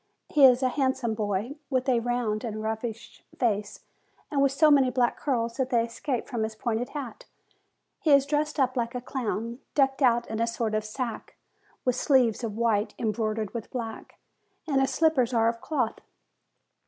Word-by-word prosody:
He 290 -3 +6
is 250 +1 +3
a 255 - +3
handsome 260 -4 0
boy, 215 +5 -2
with 260 0 0
a 250 -3 +3
round 230 -2 -1
and 215 -2 -4
roguish 220 +1 -5
face, 210 -4 -1 0.5
and 280 -2 +1
with 275 -1 +4
so 305 +2 +4
many 270 -3 +5
black 250 -1 +1
curls 235 -4 -1
that 260 -2 0
they 235 -3 +2
escape 240 +2 -3
from 240 -4 -3
his 220 0 -2
pointed 235 +1 -2
cap. 280 -6 -7 0.8
He 315 - -1
is 280 -1 +6
dressed 300 +1 -1
up 255 -1 +2
like 235 -1 -2
a 250 - -3
clown, 235 -2 -3 0.2
decked 270 -1 +2
out 240 -2 +3
in 220 0 -4
a 230 - +1
sort 230 -1 -2
of 215 0 0
sack, 230 +2 -5 0.5
with 250 -1 +2
sleeves 255 -4 +2
of 215 -2 -4
white, 225 -2 +1
embroidered 215 -1 -2
with 230 -3 -5
black, 230 -3 -6 0.5
and 275 -3 +2
his 270 - +2
slippers 265 -4 +2
are 225 0 +4
of 230 0 -5
cloth. 255 -8 -1
240 Hz, 180 wpm, -27 LUFS, 225-265 Hz, 0.8 s, He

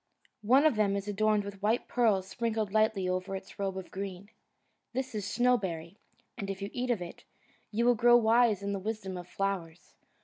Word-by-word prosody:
One 255 +8 +4
of 300 -8 +4
them 200 -2 +2
is 200 0 -3
adorned 210 0 +2
with 200 -1 -8
white 220 +4 +1
pearls 210 -6 +2
sprinkled 220 -2 -2
lightly 215 -3 +2
over 185 +1 -2
its 190 +1 -9
robe 195 -1 -2
of 190 - -7
green. 195 +1 -6 0.6
This 260 0 -3
is 205 -2 -3
Snowberry, 200 -8 0 0.4
and 200 -3 -5
if 195 -1 -4
you 200 0 -5
eat 250 +1 -2
of 220 -7 0
it, 170 - -10 0.5
you 230 +2 0
will 245 - +6
grow 240 +1 +6
wise 225 -3 +3
in 200 0 -2
the 200 - -2
wisdom 200 -2 -4
of 175 -1 -7
flowers. 180 -4 -4
200 Hz, 195 wpm, -30 LUFS, 190-230 Hz, 0.6 s, will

